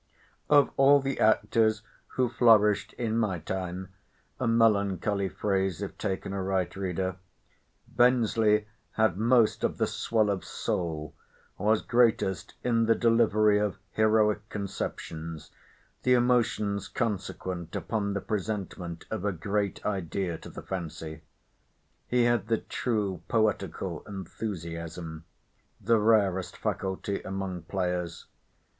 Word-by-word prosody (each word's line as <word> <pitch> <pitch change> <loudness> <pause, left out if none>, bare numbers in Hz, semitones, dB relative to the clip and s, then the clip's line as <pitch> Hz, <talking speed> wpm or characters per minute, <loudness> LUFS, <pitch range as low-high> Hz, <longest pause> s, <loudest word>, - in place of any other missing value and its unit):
Of 145 -1 +5
all 140 +1 +7
the 135 -1 -3
actors 110 0 +3 0.3
who 130 -1 +2
flourished 110 -4 +4
in 115 -1 -1
my 105 -5 0
time—a 95 +5 -6
melancholy 100 -3 +2
phrase 95 -4 -1
if 100 - -6
taken 95 -1 -3
aright, 95 -2 -1
reader—Bensley 105 +4 0 0.3
had 110 -5 +2
most 115 0 +3
of - - 0
the - - +2
swell 110 -3 +1
of 95 -2 -3
soul, 80 -4 -3 0.5
was 105 +2 +2
greatest 115 -6 +1
in 115 -2 +2
the 115 - +5
delivery 110 -3 +4
of 105 -2 -1
heroic 110 -1 +2
conceptions, 80 -6 -5 0.5
the 125 0 +4
emotions 120 -5 +1
consequent 95 -6 -3
upon 100 -3 -2
the 100 - -1
presentment 95 -5 -4
of 110 -4 -3
a 105 - +1
great 100 +3 -2
idea 95 -2 -2
to - - -10
the - - -9
fancy. 80 -3 -6 0.9
He 125 -1 +2
had 120 -3 +2
the 115 0 +2
true 105 -9 -2
poetical 110 -2 -1
enthusiasm—the 85 +1 -5
rarest 100 -4 +2
faculty 95 +1 -2
among 95 -2 -4
players. 90 0 -3
100 Hz, 110 wpm, -28 LUFS, 95-110 Hz, 0.9 s, all